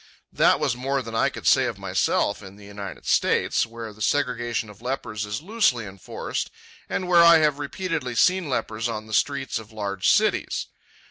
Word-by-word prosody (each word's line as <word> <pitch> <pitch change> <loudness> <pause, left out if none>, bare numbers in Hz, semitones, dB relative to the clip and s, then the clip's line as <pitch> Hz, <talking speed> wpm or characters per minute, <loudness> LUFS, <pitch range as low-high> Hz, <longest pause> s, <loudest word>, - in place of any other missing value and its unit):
That - - +4
was - - 0
more 135 +2 -1
than 115 - -8
I 115 - +2
could - - -10
say - - +5
of - - -3
myself 100 - 0
in 100 -1 -11
the 105 0 -14
United 100 -1 -8
States, - - +2
where 115 -1 -8
the 110 - -16
segregation 120 -3 0
of 105 0 -14
lepers 110 -5 -4
is 105 +7 -4
loosely 195 - +1
enforced 95 -1 -5 0.4
and 185 - -2
where 175 -1 +6
I 170 0 +8
have 150 -2 +2
repeatedly 145 -4 -3
seen 180 +3 +3
lepers 115 -2 -2
on 110 -1 -4
the 110 - -9
streets 140 0 0
of 110 0 -13
large 100 -3 -1
cities. - - +2
120 Hz, 185 wpm, -24 LUFS, 105-145 Hz, 0.4 s, I